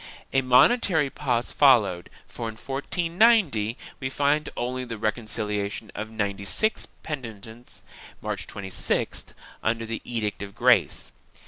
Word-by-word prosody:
A 135 - +4
momentary 145 - +4
pause 125 -5 -1
followed, 105 -11 +4 0.2
for, 115 -1 -6
in 110 - -8
1490, 165 - +2 0.2
we 130 - -3
find 145 +3 +1
only 125 +1 -2
the 115 -2 -6
reconciliation 105 -1 -2
of 110 +1 -5
ninety 100 -3 -3
six 215 - +1
penitents, 115 -5 -9 0.4
March - - -4
26th, 95 -2 -2 0.3
under 115 +1 0
the 115 0 -4
Edict 110 -4 -2
of 100 -1 -7
Grace. - - +3
120 Hz, 120 wpm, -25 LUFS, 110-140 Hz, 0.4 s, A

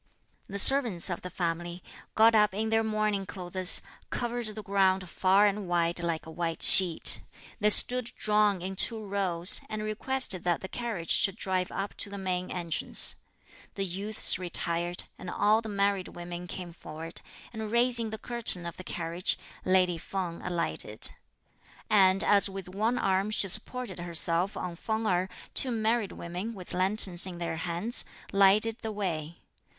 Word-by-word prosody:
The 200 - -5
servants 220 -6 +7
of 175 - -5
the 180 - -7
family, 175 0 -5 0.3
got 225 +1 +5
up 210 -3 +2
in 220 +2 -2
their 225 0 +1
mourning 215 -3 -2
clothes, 185 -1 -1 0.3
covered 240 -1 -4
the 215 0 -8
ground 190 -2 0
far 190 +3 +2
and 205 -1 -2
wide 170 0 +1
like 170 -2 -4
a 160 - -10
white 165 0 -4
sheet. 180 -4 +7 0.4
They 210 -1 +2
stood 250 +3 +8
drawn 210 -3 +1
in 190 +1 -5
two 220 +2 0
rows, 190 -3 +2
and 215 0 -5
requested 215 -2 -1
that 175 -1 -1
the 190 - -7
carriage 220 -7 -5
should 195 -2 +2
drive 185 -4 -3
up 195 +1 -5
to - - -5
the 200 - -8
main 185 -1 -4
entrance. 170 -3 +2 0.6
The 195 - -2
youths 195 +2 +1
retired, 175 -1 -3 0.2
and 180 - -8
all 215 +4 +1
the 220 - -8
married 200 -2 -1
women 175 0 -9
came 175 -1 -8
forward, 165 +1 -10 0.3
and 220 -1 -6
raising 235 -1 +1
the 220 - -6
curtain 225 -6 -1
of 170 - -8
the 185 - -9
carriage, 170 0 -2 0.3
lady 180 -2 +1
Feng 180 -1 -6
alighted; 175 -2 -1 0.8
and 195 -2 +4
as 200 -1 +4
with 195 -2 -8
one 215 +6 -2
arm 195 -1 0
she 215 -2 +1
supported 215 0 +1
herself 175 +2 0
on 180 -2 -6
Feng 220 +5 -4
Erh, 185 -1 -1 0.2
two 260 - +1
married 225 -2 -1
women, 180 +7 -7
with 185 -3 -10
lanterns 190 -1 -1
in 180 -2 -8
their 170 -1 -5
hands, 175 +8 -2 0.3
lighted 210 +4 +3
the 220 - -5
way. 170 -6 -5
190 Hz, 165 wpm, -27 LUFS, 175-215 Hz, 0.8 s, stood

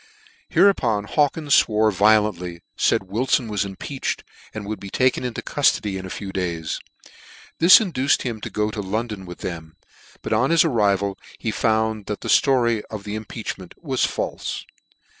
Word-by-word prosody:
Hereupon 120 - +3
Hawkins 145 +5 +1
fwore 110 -1 +1
violently, 100 -4 +2
faid - - +2
Wilfon 115 +5 0
was 105 -1 -1
impeached, 100 +8 -4 0.3
and 110 -1 -6
would 105 +1 -4
be 100 - -8
taken 130 +5 +1
into 125 -2 -4
cuflody 105 -8 +1
in 95 - -7
a - - -9
few 95 +1 -6
days. 85 -4 -3 0.8
This 170 +3 +9
induced 150 - +1
him 115 -4 -4
to - - -5
go 105 0 -1
to 105 - -4
Lon 110 +5 -2
don 100 -3 -7
with 90 - -9
them; 80 -3 -6 0.5
but - - -2
on 120 +5 +2
his 165 0 +5
arrival 100 -7 +1 0.2
he 110 - -2
found 110 -1 0
that 105 - -4
the - - -5
flo/y 120 -5 +3
of 105 -2 -6
the 105 - -6
impeachment 110 -4 -6
was 135 -6 -1
falfe. - - -2
110 Hz, 165 wpm, -22 LUFS, 100-125 Hz, 0.8 s, This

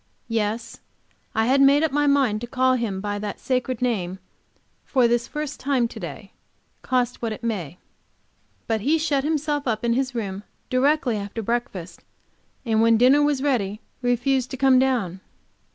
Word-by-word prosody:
Yes, 225 +1 -2 0.6
I 220 - +2
had 270 +3 +3
made 280 +2 +5
up 320 - +1
my 290 +1 +2
mind 265 -7 +2
to 240 - -5
call 260 0 +2
him 220 -6 -2
by 205 0 -3
that 205 -1 -5
sacred 255 -1 -1
name 190 -7 -1 0.7
for 255 -4 +3
the 240 +1 +3
first 300 +4 -6
time 260 -3 +1
to - - -9
day, - - -8 0.5
cost 250 -1 -1
what 230 -2 -2
it 215 - -7
may. 180 -8 -3 0.9
But 225 -2 -1
he 300 +9 +2
shut 295 -4 0
himself 295 -2 -1
up 225 0 -1
in 235 - +2
his 260 +1 -1
room 200 -4 -3 0.3
directly 260 -2 +2
after 205 +2 -5
breakfast, 195 -7 -3 0.6
and 220 -1 +2
when 230 0 +5
dinner 260 +5 +5
was 290 -2 +1
ready 215 -8 0 0.2
refused 250 +1 +1
to 265 - -6
come 265 -1 +5
down. 235 -9 0
245 Hz, 170 wpm, -23 LUFS, 220-270 Hz, 0.9 s, made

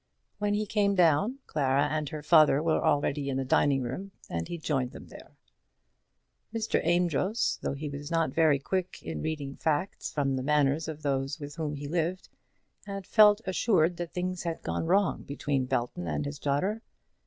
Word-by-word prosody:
When 205 0 +1
he 215 +1 0
came 200 -1 +1
down, 180 - +3
Clara 140 -2 +1
and 150 -1 -2
her 150 -1 -6
father 155 -2 +5
were 165 -1 +1
already 145 -2 +1
in 135 - -1
the 135 - -1
dining 135 0 +2
room, 185 +11 -5 0.2
and 85 -1 -2
he 170 - -5
joined 135 -6 -1
them - - -10
there. - - -14 1.1
Mr. 225 0 0
Amedroz, 175 +5 +1
though - - -2
he 150 +2 -5
was 145 +1 -6
not 165 -5 0
very 155 -3 +4
quick 185 +6 -3
in 80 -2 -5
reading 140 - -4
facts 160 +4 -1
from 140 -2 0
the - - -2
manners 145 +2 +2
of 155 -1 -7
those 135 +1 -1
with 145 -1 -7
whom 150 -2 -2
he 145 0 -6
lived, 170 +3 -2 0.6
had 195 -1 -5
felt 210 0 +6
assured 180 -3 +2
that 175 -1 -5
things 180 0 -3
had 170 -1 -4
gone 165 - -2
wrong 195 0 +2
between 140 -2 -2
Belton 120 -9 -2
and 75 -2 -2
his 70 0 -5
daughter. 185 +11 0
155 Hz, 180 wpm, -29 LUFS, 140-180 Hz, 1.1 s, felt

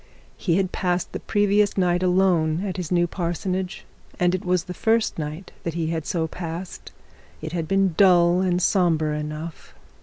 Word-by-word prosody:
He 170 -3 0
had 190 -1 0
passed 180 -1 -1
the - - -5
previous 205 -1 +2
night 180 -1 +2
alone 180 -2 +2
at 190 -1 -4
his 180 -3 -5
new 175 -1 +3
parsonage, 180 +2 -3 0.3
and 180 0 +3
it 185 - -2
was 180 -1 +1
the 180 - -7
first 225 -1 +1
night 155 +4 -6
that 165 -1 -4
he 165 -1 -1
had 160 -2 -3
so 165 -2 0
passed. 170 +2 -7 0.5
It 155 0 -6
had 165 -2 -3
been 195 -1 +2
dull 180 -2 +5
and 180 -1 +1
sombre 165 -6 +2
enough. 150 +2 -7
180 Hz, 175 wpm, -23 LUFS, 165-185 Hz, 0.5 s, dull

